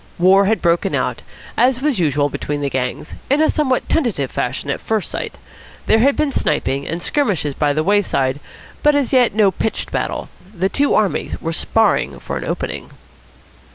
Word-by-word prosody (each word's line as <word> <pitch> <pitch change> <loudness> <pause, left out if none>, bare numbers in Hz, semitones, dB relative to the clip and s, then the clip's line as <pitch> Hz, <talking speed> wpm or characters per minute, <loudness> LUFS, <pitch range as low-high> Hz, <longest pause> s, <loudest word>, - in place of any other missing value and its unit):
War 190 +3 +5
had 215 -1 0
broken 170 0 +2
out, - - -1 0.3
as 250 0 +3
was 275 -6 0
usual 145 -3 +2
between 145 0 -4
the 140 -1 -2
gangs, 130 +3 -3 0.2
in 280 +3 +3
a 315 - +4
somewhat 265 -5 0
tentative 220 - 0
fashion 130 +3 -2
at - - -4
first 220 -3 -2
sight. - - -4 0.5
There 220 - +4
had 275 +4 +4
been 300 -2 0
sniping 140 - -1
and 165 - -3
skirmishes 185 - 0
by 145 +1 +1
the 155 +2 0
wayside, 155 -9 +1 0.4
but 295 0 +4
as 280 -3 0
yet 245 -5 +4
no 210 -3 +4
pitched 220 +4 -3
battle. - - -2 0.3
The 190 +2 0
two 285 +8 +2
armies 205 -3 0
were 165 - -3
sparring 225 +6 +1
for - - -5
an - - -4
opening. - - -4
195 Hz, 180 wpm, -19 LUFS, -, 0.5 s, War